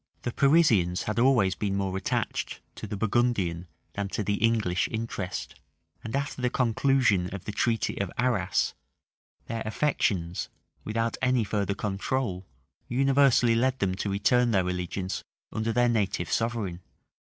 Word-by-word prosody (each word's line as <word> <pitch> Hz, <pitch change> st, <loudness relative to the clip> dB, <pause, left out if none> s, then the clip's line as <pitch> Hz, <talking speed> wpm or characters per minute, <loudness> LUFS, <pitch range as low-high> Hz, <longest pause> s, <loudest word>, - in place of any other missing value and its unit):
The 120 Hz, -, -2 dB
Parisians 120 Hz, -, +4 dB
had 105 Hz, +1 st, -2 dB
always 120 Hz, -7 st, +4 dB
been 100 Hz, +1 st, -2 dB
more 95 Hz, -1 st, -1 dB
attached 95 Hz, -, -2 dB
to -, -, -7 dB
the 105 Hz, 0 st, -4 dB
Burgundian 100 Hz, -6 st, 0 dB, 0.3 s
than 100 Hz, -1 st, -2 dB
to 105 Hz, -, -2 dB
the 100 Hz, +2 st, -1 dB
English 110 Hz, -6 st, +2 dB
interest; 110 Hz, -5 st, -4 dB, 0.5 s
and 110 Hz, -, -4 dB
after 140 Hz, -2 st, -2 dB
the 125 Hz, -, +2 dB
conclusion 120 Hz, -6 st, +2 dB
of 95 Hz, -2 st, -7 dB
the -, -, -3 dB
treaty 115 Hz, 0 st, 0 dB
of 100 Hz, -, -3 dB
Arras, 110 Hz, -6 st, +1 dB, 0.7 s
their 115 Hz, 0 st, -4 dB
affections, 100 Hz, -, 0 dB, 0.3 s
without 115 Hz, +1 st, -1 dB
any 130 Hz, -2 st, +3 dB
further 100 Hz, -1 st, -1 dB
control, 100 Hz, -1 st, -2 dB, 0.4 s
universally 135 Hz, -2 st, +4 dB
led 130 Hz, +3 st, +2 dB
them 95 Hz, -5 st, 0 dB
to 100 Hz, +2 st, -3 dB
return 120 Hz, +5 st, +3 dB
to -, -, +1 dB
their 95 Hz, -2 st, +2 dB
allegiance 90 Hz, +2 st, -3 dB, 0.3 s
under 110 Hz, +1 st, -1 dB
their 120 Hz, +1 st, +3 dB
native 100 Hz, -7 st, 0 dB
sovereign. 115 Hz, -7 st, -1 dB
110 Hz, 145 wpm, -27 LUFS, 95-120 Hz, 0.7 s, Parisians